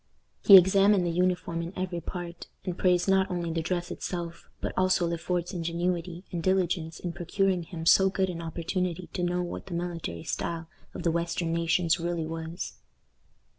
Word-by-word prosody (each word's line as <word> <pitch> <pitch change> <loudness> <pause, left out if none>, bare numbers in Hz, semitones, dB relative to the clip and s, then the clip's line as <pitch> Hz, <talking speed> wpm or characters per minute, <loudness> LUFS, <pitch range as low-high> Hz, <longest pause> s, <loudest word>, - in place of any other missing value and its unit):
He 200 - +11
examined 195 +1 +5
the 170 - 0
uniform 180 -1 0
in 170 +2 -6
every 180 -2 -2
part, 175 -1 -6 0.2
and 180 - -2
praised 180 0 +2
not 190 0 +3
only 175 -2 -2
the 165 - 0
dress 175 +1 -2
itself, 170 -2 -5
but - - -3
also 185 -1 +3
Le 170 0 -2
Fort's 175 +1 -2
ingenuity 175 +1 -2
and 175 - -2
diligence 175 -3 0
in 175 -1 -4
procuring 180 +2 0
him 165 -1 -7
so 190 +3 +6
good 190 -1 0
an 170 -1 -6
opportunity 170 +2 -3
to - - -2
know 180 0 0
what 175 - -6
the 175 - -4
military 170 - -4
style 165 -1 -3 0.3
of - - -5
the 170 - +2
western 170 0 -1
nations 170 0 +2
really 170 -1 -2
was. 165 +1 -5
175 Hz, 175 wpm, -28 LUFS, 170-185 Hz, 0.3 s, He